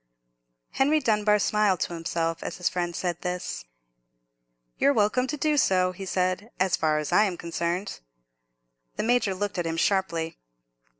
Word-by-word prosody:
Henry 295 +3 +3
Dunbar 210 -4 +3
smiled 210 -3 +2
to - - -1
himself 165 0 -2
as - - -5
his 180 - -1
friend 175 -2 -2
said 175 -1 -2
this. 180 - -4 1.1
"You're 280 - +4
welcome 225 +4 +2
to 300 +3 -3
do 300 +1 +1
so," 185 -7 +3
he 190 +1 -8
said, 185 +4 -1
"as 185 -1 +3
far 155 -1 +1
as 150 -1 -3
I 210 - +5
am 185 -4 -3
concerned." 170 +3 -3 1.0
The - - -2
Major 225 -4 +2
looked 200 -1 -3
at 170 - -1
him 165 0 -2
sharply. 170 -4 0
185 Hz, 160 wpm, -26 LUFS, 170-210 Hz, 1.1 s, I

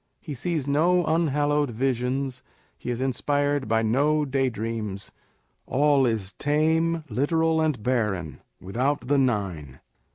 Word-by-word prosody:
He 150 - -7
sees 155 +2 -2
no 170 +5 +3
unhallosved 150 -3 +1
visions, 130 +2 -1 0.3
he - - -7
is 120 0 -2
inspired 145 +1 0
by 115 +1 +2
no 145 +7 +2
daydreams. 115 -6 -2 0.6
All 140 -1 +3
is 105 -4 -2
tame, 160 +2 +1
literal, 160 +6 +1
and 150 -9 0
barren, 105 - -1 0.2
without 125 +10 -1
the 145 +1 +3
Nine. 95 - -1
135 Hz, 120 wpm, -25 LUFS, 115-150 Hz, 0.6 s, no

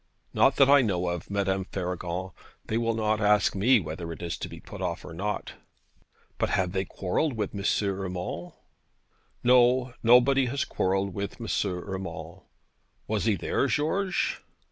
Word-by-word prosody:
'Not 135 0 +4
that 135 - +6
I 140 0 +7
know 90 -6 0
of, 85 -1 -5
Madame 95 -1 0
Faragon: 90 0 -4 0.3
they 110 - -3
will 115 0 +1
not 110 -1 0
ask 105 -1 +4
me 115 +5 +4
whether 85 0 -6
it 80 - -8
is 85 - -2
to - - -5
be - - -10
put - - -10
off 90 -2 -3
or 85 - -8
not.' 105 +5 -3 0.9
'But - - +1
have 90 -2 +1
they 95 0 -1
quarrelled 100 - -1
with 105 -4 -3
M. 100 -1 -5 0.2
Urmand?' 90 -2 -4 0.9
'No; 125 0 +4
nobody 125 +3 +5
has 135 +3 -1
quarrelled 95 +1 0
with 100 +4 -5
M. 115 - -6 0.2
Urmand.' 95 +1 -6 0.6
'Was 110 -1 -1
he 110 -3 +3
there, 90 - 0
George?' 185 +6 0
100 Hz, 160 wpm, -27 LUFS, 90-120 Hz, 0.9 s, I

